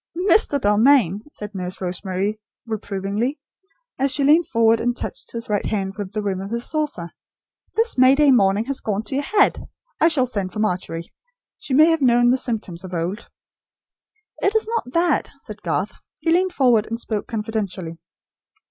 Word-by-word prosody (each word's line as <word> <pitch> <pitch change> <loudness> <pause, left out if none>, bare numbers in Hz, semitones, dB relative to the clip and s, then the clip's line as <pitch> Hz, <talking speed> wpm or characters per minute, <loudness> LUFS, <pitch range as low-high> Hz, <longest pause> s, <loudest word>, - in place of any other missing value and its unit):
"Mr. 360 -5 +3
Dalmain," 210 -3 +4
said 210 -5 -8
Nurse 185 -1 -5
Rosemary, 190 +3 -3 0.3
reprovingly, 215 +4 -3 0.6
as 275 +1 +2
she 280 +1 0
leaned 310 +5 +4
forward 230 -1 +3
and 245 +1 -1
touched - - -7
his 230 0 -5
right 205 -1 -1
hand 195 -3 -2
with 205 -3 -6
the 215 0 -3
rim 190 -2 -2
of 195 - -6
his 235 +2 -3
saucer, 295 - -2 0.6
"this 455 - +1
May 260 +1 +7
Day 295 -1 +5
morning 205 -2 +3
has 275 +1 -3
gone 210 0 -2
to 265 - -7
your 280 +2 0
head. 410 +5 +2 0.3
I - - +6
shall 295 -6 +3
send 200 -7 -4
for - - -7
Margery. 180 -5 -2 0.5
She 260 - -2
may 305 +3 +8
have 325 -2 +1
known 240 -1 +4
the 255 - +3
symptoms, 200 -8 -3
of 185 -1 -6
old." 175 +6 -4 1.1
"It 400 +2 +1
is 440 - +2
not 460 - -2
that," 340 +4 +1
said - - -10
Garth. - - -2 0.2
He 330 - -1
leaned 365 +2 +2
forward 245 -7 +3
and 230 +1 -4
spoke 215 -3 -3
confidentially. 205 -7 -4
225 Hz, 175 wpm, -21 LUFS, 195-275 Hz, 1.1 s, may